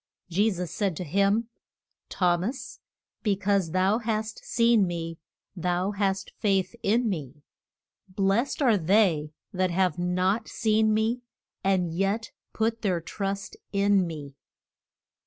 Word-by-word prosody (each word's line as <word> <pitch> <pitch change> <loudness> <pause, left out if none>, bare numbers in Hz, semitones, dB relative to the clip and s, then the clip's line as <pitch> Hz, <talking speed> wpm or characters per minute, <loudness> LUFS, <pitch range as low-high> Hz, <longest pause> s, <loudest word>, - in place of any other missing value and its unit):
Je 205 +6 +3
sus 180 -5 -4
said 190 -3 -1
to - - -3
him, 200 +7 +2 0.6
Thom 175 -2 +2
as, 250 +7 -5 0.4
be 205 -3 +1
cause 195 -2 +1
thou 190 +6 +2
hast 220 -1 -3
seen 230 -4 +3
me, 165 -1 -4 0.4
thou 180 +2 0
hast 195 -1 -1
faith 195 -2 +1
in 230 +4 +2
me; 150 - -4 0.7
blest 200 +10 +1
are 235 -5 +5
they 175 -4 +2 0.2
that 185 0 +1
have 180 -1 +1
not 185 +5 +1
seen 220 -1 +2
me, 220 +3 +1 0.4
and 185 -4 +1
yet 195 +5 -1 0.2
put 225 +1 -1
their 185 -5 +1
trust 195 +4 -4 0.2
in 200 -2 +3
me. 150 -4 -7
195 Hz, 130 wpm, -27 LUFS, 180-215 Hz, 0.7 s, are